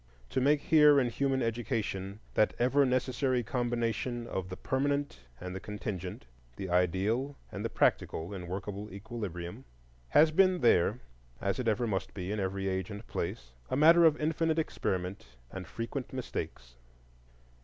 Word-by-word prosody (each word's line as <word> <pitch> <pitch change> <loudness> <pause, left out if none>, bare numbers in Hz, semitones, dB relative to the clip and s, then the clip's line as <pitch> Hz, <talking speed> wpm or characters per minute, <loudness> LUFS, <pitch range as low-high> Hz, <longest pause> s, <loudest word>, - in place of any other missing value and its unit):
To 130 - +1
make 145 +2 +4
here 150 -2 +6
in 125 -3 +1
human 135 0 0
education 110 -4 -2
that 110 - +2
ever 135 +3 +3
necessary 130 0 +1
combination 120 0 -1
of 95 -5 -4
the 90 - -6
permanent 140 - -1 0.2
and 90 0 -6
the - - -3
contingent—of 90 - -7
the 95 -2 -5
ideal 100 - +1 0.2
and 100 - -5
the 115 - -1
practical 85 -2 +1
in 90 -3 -6
workable 100 +3 -5
equilibrium—has 85 - -1
been 185 +2 +4
there, 110 +1 +4 0.4
as 100 +5 -1
it 125 - -2
ever 110 +2 +2
must 95 -4 -2
be 95 0 -4
in 105 - -1
every 95 0 -2
age 95 +1 -1
and 105 +1 -7
place, - - -4 0.2
a - - 0
matter 165 +3 +7
of 155 -2 +5
infinite 160 +1 +1
experiment 95 - -2 0.3
and 95 -2 -7
frequent 115 +3 -5
mistakes. 60 - -5
110 Hz, 150 wpm, -31 LUFS, 95-130 Hz, 0.4 s, matter